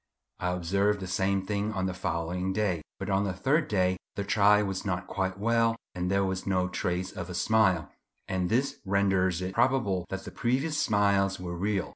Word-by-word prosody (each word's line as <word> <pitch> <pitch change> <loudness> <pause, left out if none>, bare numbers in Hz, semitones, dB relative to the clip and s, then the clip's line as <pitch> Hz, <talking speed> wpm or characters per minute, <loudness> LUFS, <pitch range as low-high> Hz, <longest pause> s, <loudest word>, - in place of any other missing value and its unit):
I 90 0 0
observed 100 +4 +1
the 95 - -5
same 95 +1 0
thing 105 +1 -1
on 95 -2 -1
the 95 - -1
following 90 +1 -2
day; 95 -5 0 0.2
but 95 - -5
on 100 0 +2
the 100 -2 -1
third 145 - +1
day 95 -2 +1 0.2
the 100 - -2
child 105 0 +4
was 95 -1 -3
not 90 -2 -2
quite 95 -1 -2
well 115 +2 +2 0.2
and 90 0 -2
there 100 0 +2
was 95 0 -3
no 90 -2 +1
trace 90 0 -2
of 90 0 -6
a 90 - -5
smile, 95 -6 +2 0.4
and 90 -1 -1
this 130 +5 0
renders 95 -2 +1
it 95 +1 -3
probable 115 -7 +1
that 95 0 -4
the - - -7
previous 135 +6 0
smiles 100 -2 +2
were 90 -1 -5
real. 100 +2 -1
95 Hz, 195 wpm, -28 LUFS, 90-105 Hz, 0.4 s, child